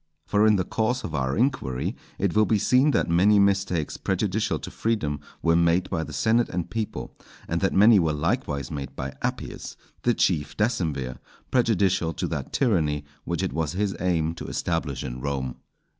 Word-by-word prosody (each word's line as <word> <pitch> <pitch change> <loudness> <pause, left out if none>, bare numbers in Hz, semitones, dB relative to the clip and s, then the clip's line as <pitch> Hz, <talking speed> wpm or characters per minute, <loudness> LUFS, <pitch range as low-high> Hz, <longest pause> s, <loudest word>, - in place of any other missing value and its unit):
For 105 +1 +3
in 105 - +5
the 95 - +1
course 120 +7 -1
of 80 - -5
our 65 -1 -1
inquiry 115 - 0 0.2
it 95 -3 0
will 110 0 +4
be 110 - +3
seen 130 +7 +4
that - - +2
many 95 +5 +4
mistakes 95 -5 +1
prejudicial 100 +2 0
to - - -8
freedom 80 -11 -1 0.2
were 85 0 +4
made 85 +2 +2
by 80 -4 0
the - - -8
senate 115 +1 +2
and 90 -1 -3
people, 110 -2 -4 0.3
and 85 0 -1
that 95 - +2
many 105 +2 +6
were 80 -3 +2
likewise 75 -3 -1
made 70 -3 -5
by 65 0 -5
Appius, - - -4 0.2
the 120 -1 +2
chief 75 -7 0
decemvir, 80 - -1 0.3
prejudicial 95 -8 +2
to - - -3
that - - -4
tyranny 75 - +1 0.2
which 85 +2 -2
it 95 - -2
was 80 0 -1
his 100 +1 -1
aim 80 -3 +1
to 85 - -8
establish 80 -5 -2
in 65 -1 -6
Rome. 65 -3 -3
90 Hz, 180 wpm, -25 LUFS, 75-105 Hz, 0.3 s, many